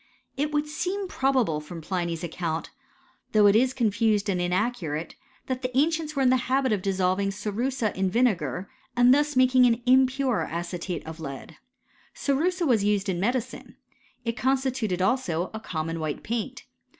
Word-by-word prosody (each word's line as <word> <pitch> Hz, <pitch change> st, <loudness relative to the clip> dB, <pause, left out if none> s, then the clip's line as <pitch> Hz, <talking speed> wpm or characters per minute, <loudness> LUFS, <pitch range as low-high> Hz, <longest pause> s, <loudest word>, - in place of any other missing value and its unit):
It 295 Hz, +2 st, -1 dB
would 295 Hz, 0 st, +1 dB
seem 370 Hz, +6 st, -3 dB
probable 260 Hz, -, +1 dB
from 165 Hz, +3 st, -8 dB
Pliny'sr^ 170 Hz, 0 st, -3 dB
account, 165 Hz, -1 st, -3 dB, 0.6 s
though 210 Hz, -1 st, +5 dB
it 200 Hz, 0 st, +6 dB
is 250 Hz, +3 st, +4 dB
confused 220 Hz, -3 st, +1 dB
and 180 Hz, -2 st, 0 dB
inaccurate, 175 Hz, -4 st, -1 dB, 0.3 s
thatfij 260 Hz, -1 st, -2 dB
the 255 Hz, 0 st, -3 dB
ancients 310 Hz, +1 st, +1 dB
were 275 Hz, -, +1 dB
in 255 Hz, -, +5 dB
the 260 Hz, -, +4 dB
habit 265 Hz, -1 st, +2 dB
of 200 Hz, -, -1 dB
dissolving 190 Hz, 0 st, +1 dB
cerussa 215 Hz, +4 st, -2 dB
ineJl 190 Hz, 0 st, 0 dB
vinegar, 200 Hz, -4 st, 0 dB, 0.3 s
and 245 Hz, +1 st, +7 dB
thus 295 Hz, +1 st, +1 dB
making 255 Hz, 0 st, +5 dB
an 235 Hz, 0 st, +1 dB
impure 260 Hz, -1 st, +3 dB
acetate 170 Hz, 0 st, -4 dB
of 160 Hz, +1 st, -8 dB
lead, 145 Hz, +1 st, -8 dB, 0.6 s
js -, -, -19 dB, 0.2 s
Cerussa 355 Hz, +4 st, 0 dB
was 235 Hz, -8 st, +3 dB
used 205 Hz, -1 st, +1 dB
in 175 Hz, -2 st, -1 dB
medicine. 240 Hz, +5 st, -2 dB, 0.5 s
It 230 Hz, 0 st, -1 dB
constituted 255 Hz, -8 st, 0 dB
also 185 Hz, -6 st, +1 dB
^ -, -, -10 dB
a 220 Hz, -, -4 dB
common 165 Hz, -5 st, -4 dB
white 155 Hz, -2 st, -3 dB
paint. 235 Hz, +3 st, -4 dB
220 Hz, 165 wpm, -26 LUFS, 180-260 Hz, 0.6 s, and